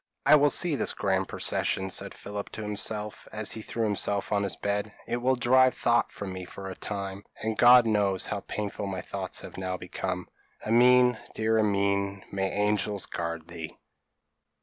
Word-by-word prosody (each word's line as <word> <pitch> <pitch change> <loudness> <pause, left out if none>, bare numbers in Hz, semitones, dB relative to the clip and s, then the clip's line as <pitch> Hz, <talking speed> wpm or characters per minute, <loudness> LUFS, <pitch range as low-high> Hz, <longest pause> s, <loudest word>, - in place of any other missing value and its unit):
p> - - +4
"I - - +11
will 145 0 +5
see 165 +1 +1
this - - 0
grand - - 0
procession," 95 0 -1
said - - -1
Philip 100 0 -6
to 110 - -5
himself, 105 0 -3
as 110 0 -1
he 110 - -4
threw 115 +1 -3
himself 100 -1 0
on 105 -1 +2
his 100 -4 -1
bed. 105 +1 -2
"It 120 - -2
will 130 +2 +2
drive 130 +1 +4
thought 120 0 +2
from 95 -2 -6
me 95 0 -6
for 95 +2 -9
a - - -7
time; 100 -1 -5 0.2
and 110 0 -1
God 120 +1 +7
knows 100 -4 +1
how 100 - -3
painful 100 0 -4
my 95 -1 -3
thoughts - - -5
have - - -10
now 95 -1 -3
become. 90 0 -4 0.4
Amine, 125 +1 +5 0.2
dear 110 0 +2
Amine, 100 -1 +1
may 95 -1 -1
angels 105 -1 0
guard 85 -1 -4
thee!" 85 -2 -8
105 Hz, 180 wpm, -28 LUFS, 95-110 Hz, 0.4 s, I